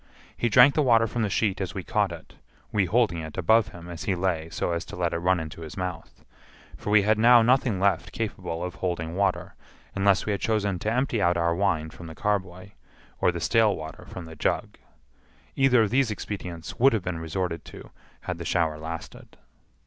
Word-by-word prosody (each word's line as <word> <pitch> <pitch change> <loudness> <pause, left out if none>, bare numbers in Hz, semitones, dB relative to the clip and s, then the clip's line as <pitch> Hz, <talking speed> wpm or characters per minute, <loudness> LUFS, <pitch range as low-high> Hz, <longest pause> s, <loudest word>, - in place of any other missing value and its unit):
He 120 - 0
drank 125 +5 +7
the 155 - +2
water 115 -5 +4
from 115 +1 -3
the 105 - 0
sheet 100 -1 0
as - - -4
we - - -4
caught - - 0
it - - -10 0.4
(we 105 -2 +2
holding 105 -2 +1
it 80 -1 -8
above 110 +4 +4
him 85 0 -11
as 85 -2 -7
he 95 - +1
lay 85 -3 -1
so 85 - -2
as 85 -1 -2
to - - -9
let 90 -1 -1
it 85 - -1
run 90 +1 +2
into 80 +1 -7
his 80 +2 -9
mouth), 90 -3 -6 0.5
for - - -6
we 105 -1 +5
had 110 +1 +2
now 120 +1 +7
nothing 120 -4 +2
left 95 -3 +1
capable 90 -6 -4
of 90 0 -4
holding 85 -2 -3
water, 100 -1 0 0.4
unless 100 -1 +2
we 105 - -1
had 100 - -2
chosen 100 -4 0
to 110 - -1
empty 125 -2 0
out 85 -1 +2
our 85 0 +1
wine 85 -4 0
from 85 - -11
the 80 - -9
carboy, 95 -2 -2 0.5
or - - +3
the 85 - -5
stale 110 +3 +3
water 80 0 -9
from 90 - -8
the 80 0 -10
jug. 75 - -2 0.8
Either 125 -4 +4
of 105 - -1
these 130 -1 +2
expedients 90 -5 -6
would 135 +2 +5
have 110 -5 0
been 90 -2 -3
resorted 80 0 -3
to - - -12 0.3
had 90 -2 -5
the - - -4
shower 80 -3 0
lasted. 80 +1 -8
95 Hz, 210 wpm, -26 LUFS, 85-110 Hz, 0.8 s, drank